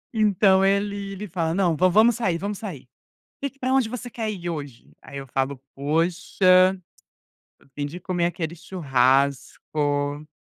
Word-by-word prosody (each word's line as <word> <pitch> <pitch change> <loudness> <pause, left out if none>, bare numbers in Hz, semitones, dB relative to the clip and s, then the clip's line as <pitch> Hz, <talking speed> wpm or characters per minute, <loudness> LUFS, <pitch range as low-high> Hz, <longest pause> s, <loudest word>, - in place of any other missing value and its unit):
Então 200 -2 +4
ele 200 0 0
ele 205 +2 -6
fala: 165 -1 -2
"Não, 180 -4 +2
va 185 +4 +4
vamos 220 +5 +5
sair, 190 -8 0
vamos 200 +3 -4
sair, 165 - -7 0.5
que 275 -1 -5
pra 260 -1 -1
onde 265 -4 +3
você 245 0 -6
quer 220 -2 -3
ir 175 -4 -5
hoje?", 145 -7 -8
aí 140 - -11
eu 135 0 -6
falo: 135 +2 -2 0.2
"Poxa, 180 +5 +3 0.8
tô - - -26
afim 145 +1 -5
de 150 +5 -7
comer 175 -1 -1
aquele 170 -1 -3
churrasco", 145 -1 0
180 Hz, 155 wpm, -24 LUFS, 145-200 Hz, 0.8 s, vamos